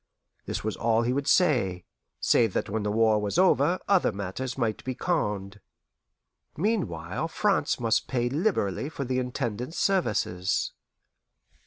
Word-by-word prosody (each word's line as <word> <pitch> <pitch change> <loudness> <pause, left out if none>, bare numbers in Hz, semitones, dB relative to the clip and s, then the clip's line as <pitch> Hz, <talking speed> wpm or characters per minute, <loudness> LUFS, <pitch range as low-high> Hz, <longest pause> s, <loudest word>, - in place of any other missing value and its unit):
This - - -3
was 110 0 -2
all 115 0 +2
he 120 +2 0
would 140 +1 -2
say, 110 - +2 0.3
save 115 -5 +3
that - - -2
when 110 +1 -1
the 105 0 -1
war 110 -1 +3
was 105 +8 -2
over 180 -2 +4
other 195 -3 +3
matters 100 +7 -5
might 115 -4 -1
be 130 -1 -3
conned. 105 - -2 1.0
Meanwhile 125 - -1
France 195 -5 +1
must 115 -2 +1
pay 120 -2 0
liberally 140 - 0
for 140 -3 -5
the 130 0 0
Intendant's 125 +2 -3
services. 105 - 0
120 Hz, 140 wpm, -27 LUFS, 105-145 Hz, 1.0 s, over